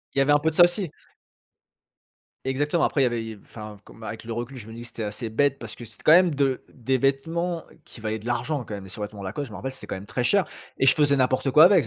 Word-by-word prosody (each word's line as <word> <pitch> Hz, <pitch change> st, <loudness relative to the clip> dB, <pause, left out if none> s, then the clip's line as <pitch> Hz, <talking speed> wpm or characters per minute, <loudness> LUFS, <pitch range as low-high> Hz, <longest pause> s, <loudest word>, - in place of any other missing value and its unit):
Il -, -, +2 dB
y -, -, +6 dB
avait 145 Hz, +2 st, +3 dB
un 145 Hz, -, +6 dB
peu 160 Hz, +2 st, +2 dB
de 155 Hz, -, -7 dB
ça 175 Hz, -, +9 dB
aussi. 175 Hz, -2 st, +2 dB, 1.6 s
Exactement. 145 Hz, +5 st, +1 dB
Après, 140 Hz, -, +2 dB
il -, -, +5 dB
y -, -, +5 dB
avait, 120 Hz, -1 st, -1 dB
heu, 105 Hz, -, -15 dB
enfin 105 Hz, -2 st, -9 dB
f -, -, -26 dB
comme, -, -, -16 dB
bah, 110 Hz, -, -6 dB
avec 110 Hz, -, -7 dB
le 115 Hz, -, -7 dB
recul, 120 Hz, +4 st, -4 dB
je 110 Hz, -3 st, -9 dB
me 110 Hz, -, -9 dB
dis 115 Hz, -, -8 dB
que 120 Hz, -, -7 dB
c'était 115 Hz, -1 st, -6 dB
assez 110 Hz, +2 st, -3 dB
bête 140 Hz, +4 st, +2 dB
parce 115 Hz, -2 st, -8 dB
que -, -, -10 dB
c'était 115 Hz, -, -13 dB
quand -, -, +6 dB
même 175 Hz, 0 st, +7 dB
de 135 Hz, -2 st, +1 dB
des 130 Hz, +1 st, -1 dB
vêtements 165 Hz, +6 st, 0 dB, 0.2 s
qui 115 Hz, -, -11 dB
valaient 110 Hz, 0 st, -2 dB
de 110 Hz, -, -9 dB
l'argent 125 Hz, +3 st, -1 dB
quand 105 Hz, -, -6 dB
même. 100 Hz, -, -7 dB
Les 95 Hz, -, -11 dB
survêtement 105 Hz, -2 st, -6 dB
Lacoste 105 Hz, +10 st, -4 dB
je -, -, -14 dB
m'en 105 Hz, -, -7 dB
rappelle, 135 Hz, -, -4 dB
c'était -, -, -10 dB
quand -, -, -3 dB
même 95 Hz, -, -8 dB
très 120 Hz, +4 st, -2 dB
cher 200 Hz, +8 st, +3 dB, 0.3 s
et 135 Hz, -, +2 dB
je -, -, +7 dB
faisais 145 Hz, -2 st, +3 dB
n'importe 130 Hz, +1 st, +2 dB
quoi 150 Hz, +5 st, +8 dB
avec. 195 Hz, +2 st, +7 dB
Je -, -, -1 dB
130 Hz, 305 wpm, -25 LUFS, 110-145 Hz, 1.6 s, ça